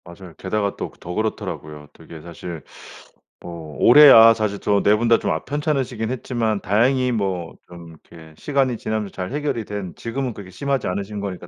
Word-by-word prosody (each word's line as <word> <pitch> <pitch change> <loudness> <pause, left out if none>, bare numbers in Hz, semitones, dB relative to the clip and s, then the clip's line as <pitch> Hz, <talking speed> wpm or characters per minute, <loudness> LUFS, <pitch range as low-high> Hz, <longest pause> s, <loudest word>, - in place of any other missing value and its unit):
맞아요. 85 0 -13
게다가 100 +1 -2
또 - - -4
그 - - -23
더 90 - -7
그렇더라고요. 75 -8 -4
되게 80 -2 -13
사실 85 -1 -9 0.8
어 85 -3 -9
올해 145 +4 +8
아 115 -1 +9
사실 105 -3 -3
저 100 -1 +1
4 105 - +4
분 120 +2 -1
다 115 - +5
좀 - - -2
아 80 +1 -2
편찮으시긴 135 -6 -2
했지만 115 -4 -2
다행히 125 +6 +2
뭐 95 -7 -3
좀 85 -1 -12
이렇게 80 0 -16
시간이 135 -4 0
지나면서 110 -2 -3
잘 90 +2 -5
해결이 145 -6 -2
된 100 -4 -6
지금은 125 +1 -4
그렇게 100 -3 -11
심하지 135 +8 -2
않으신 100 +3 -4
거니까 95 -3 -6
105 Hz, 380 characters per minute, -21 LUFS, 90-120 Hz, 0.8 s, 아